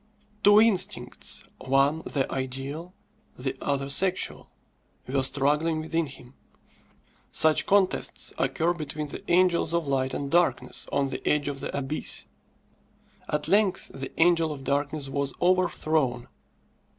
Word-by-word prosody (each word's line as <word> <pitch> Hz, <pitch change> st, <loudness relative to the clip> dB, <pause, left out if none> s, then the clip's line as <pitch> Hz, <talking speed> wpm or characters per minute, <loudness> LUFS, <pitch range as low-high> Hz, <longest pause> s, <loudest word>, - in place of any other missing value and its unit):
Two 205 Hz, +1 st, +7 dB
instincts 215 Hz, -5 st, 0 dB, 0.2 s
one 135 Hz, +4 st, +2 dB
the 140 Hz, -4 st, -2 dB
ideal, 135 Hz, +7 st, -4 dB, 0.4 s
the 130 Hz, +1 st, -3 dB
other 140 Hz, -1 st, -1 dB
sexual 185 Hz, +7 st, +1 dB, 0.6 s
were 135 Hz, +1 st, 0 dB
struggling 145 Hz, +4 st, +1 dB
within 160 Hz, 0 st, -1 dB
him. 130 Hz, -2 st, -12 dB, 1.0 s
Such 155 Hz, -1 st, +3 dB
contests 195 Hz, -2 st, +1 dB
occur 170 Hz, 0 st, +1 dB
between 150 Hz, -2 st, -5 dB
the -, -, -7 dB
angels 170 Hz, -2 st, +3 dB
of 170 Hz, -2 st, 0 dB
light 135 Hz, -1 st, -1 dB
and 140 Hz, -1 st, -4 dB
darkness 175 Hz, 0 st, +1 dB
on 140 Hz, -1 st, +1 dB
the -, -, -5 dB
edge 150 Hz, -1 st, +2 dB
of 140 Hz, -1 st, -3 dB
the -, -, -4 dB
abyss. 140 Hz, +2 st, -2 dB, 1.0 s
At 150 Hz, 0 st, -1 dB
length 195 Hz, +1 st, +2 dB
the 135 Hz, 0 st, -6 dB
angel 165 Hz, -1 st, +4 dB
of 140 Hz, -3 st, -7 dB
darkness 145 Hz, +1 st, -1 dB
was 140 Hz, 0 st, -2 dB
overthrown. 155 Hz, -8 st, +1 dB
150 Hz, 125 wpm, -26 LUFS, 135-170 Hz, 1.0 s, Two